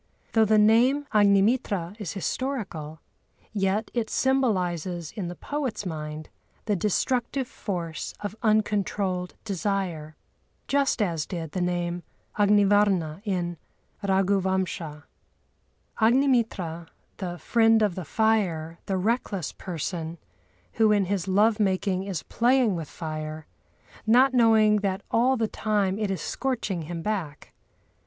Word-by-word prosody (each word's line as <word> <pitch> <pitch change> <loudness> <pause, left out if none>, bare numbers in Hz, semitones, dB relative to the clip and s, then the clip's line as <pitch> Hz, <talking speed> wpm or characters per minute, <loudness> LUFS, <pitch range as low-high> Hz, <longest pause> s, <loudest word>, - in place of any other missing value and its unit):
Though 225 -1 +4
the 215 +1 +4
name 240 +7 +4
Agnimitra 200 -2 +3
is 185 - -4
historical, 195 - -4 0.5
yet 200 +1 0
it 235 -3 -1
symbolises 180 - 0
in 200 -6 -5
the 175 - -6
poet's 275 - -3
mind 155 -2 -5 0.4
the 210 - +1
destructive 245 +6 0
force 170 -9 -5
of 205 0 -5
uncontrolled 205 -4 0
desire—just 195 - -2
as 165 -6 -2
did 165 -5 -5
the 185 - -2
name 175 0 -1 0.3
Agnivarna 205 -5 +3
in 175 -4 -2 0.4
Raghuvamsha. 190 -5 0 1.0
Agnimitra, 225 - +2 0.3
"the 175 -3 -4
friend 225 +3 +3
of 205 -4 +2
the 185 - -5
fire," 170 -5 0
the 195 - 0
reckless 200 - -1
person, 170 -1 -5 0.6
who 220 -1 +4
in 205 -2 +3
his 190 -1 -2
love 210 +3 +3
making 190 -1 0
is 190 -6 -4
playing 240 -3 +2
with 160 -4 -5
fire, 155 -1 -6 0.6
not 255 +4 +5
knowing 220 -3 +5
that 195 -1 -2
all 255 +3 +3
the 225 -1 +1
time 205 -3 0
it 210 -2 -1
is 195 - -2
scorching 230 -9 -2
him 165 +1 -6
black. 185 -9 -4
195 Hz, 120 wpm, -26 LUFS, 175-220 Hz, 1.0 s, not